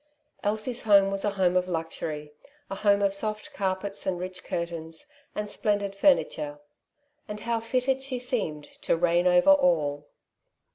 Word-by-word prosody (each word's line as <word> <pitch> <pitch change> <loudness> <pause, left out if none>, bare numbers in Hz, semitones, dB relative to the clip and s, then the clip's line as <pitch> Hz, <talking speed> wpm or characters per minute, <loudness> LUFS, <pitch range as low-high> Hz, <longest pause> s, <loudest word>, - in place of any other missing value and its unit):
Elsie's 220 +4 -1
home 200 -2 +5
was 195 0 -2
a 205 - +2
home 190 -3 +1
of 180 0 +2
luxury, 160 -3 -4 0.4
a - - -2
home 200 -1 +3
of 200 -1 +2
soft 215 +1 -3
carpets, 195 +1 -3
and 180 -2 -1
rich 185 0 -6
curtains, 165 -2 -5 0.3
and 210 0 -2
splendid 205 -1 -1
furni 275 +8 +4
ture; 145 -1 -6 0.7
and 210 -1 -6
how 235 -1 -1
fitted 255 +3 0
she 265 -1 -3
seemed 220 - -2
to 165 - -2
reign 175 +1 +2
over 180 +9 +6
all 155 - +2
195 Hz, 155 wpm, -27 LUFS, 170-215 Hz, 0.7 s, over